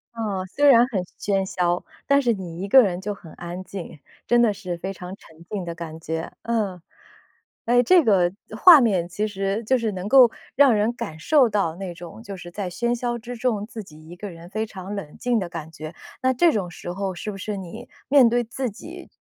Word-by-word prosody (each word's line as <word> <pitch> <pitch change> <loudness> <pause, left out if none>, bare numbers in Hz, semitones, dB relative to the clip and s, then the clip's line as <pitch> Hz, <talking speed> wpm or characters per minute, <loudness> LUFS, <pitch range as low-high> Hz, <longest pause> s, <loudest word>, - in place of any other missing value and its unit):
嗯， 205 -5 -3
虽 285 +10 0
然 240 -3 +7
很 205 -8 -1 0.2
喧 195 -1 0
嚣， 175 -2 0 0.2
但 280 0 +4
是 240 -3 +2
你 180 -3 -7
一 200 - -3
个 260 +5 +8
人 185 -5 0
就 205 +2 -3
很 170 -5 -13
安 175 +2 -7
静， 185 -5 -8 0.3
真 240 0 +4
的 225 -3 +3
是 185 -4 -5
非 190 +3 -4
常 180 0 -8
沉 165 -4 -18
静 205 -3 -3
的 170 -1 -5
感 165 -1 -7
觉， 160 0 -4
嗯。 205 -7 -1 0.8
哎， 245 +1 +4
这 360 +8 +6
个 185 -7 +3 0.3
画 340 +4 +9
面 185 -7 +1
其 210 +4 -2
实 195 +1 -2
就 260 +4 +3
是 230 -3 -1
能 185 0 -5
够 250 0 +7 0.2
让 275 -4 +6
人 215 +3 +1
感 160 -8 -6
受 270 - +4
到 195 -6 0
那 185 -1 -6
种， 175 +6 -11
就 195 -2 -7
是 175 -1 -9
在 190 +1 -4
喧 235 +7 -1
嚣 240 0 -2
之 245 +2 -8
中 225 -4 -1
自 225 -2 -7
己 155 -3 -15
一 175 - -9
个 195 +1 -7
人 170 +1 -12
非 220 +2 -2
常 195 -1 -7
冷 160 -7 -7
静 245 -1 +1
的 185 -4 -2
感 160 -3 -7
觉。 155 +1 -8 0.3
那 260 0 +2
这 330 +6 +4
种 185 -5 -2
时 175 +1 -7
候 195 0 -3
是 180 +4 -6
不 205 - -5
是 205 +1 -4
你 195 +6 -9 0.2
面 265 -4 +6
对 240 +1 +2
自 250 +2 -3
己 340 - -11
200 Hz, 240 characters per minute, -23 LUFS, 175-235 Hz, 0.8 s, 画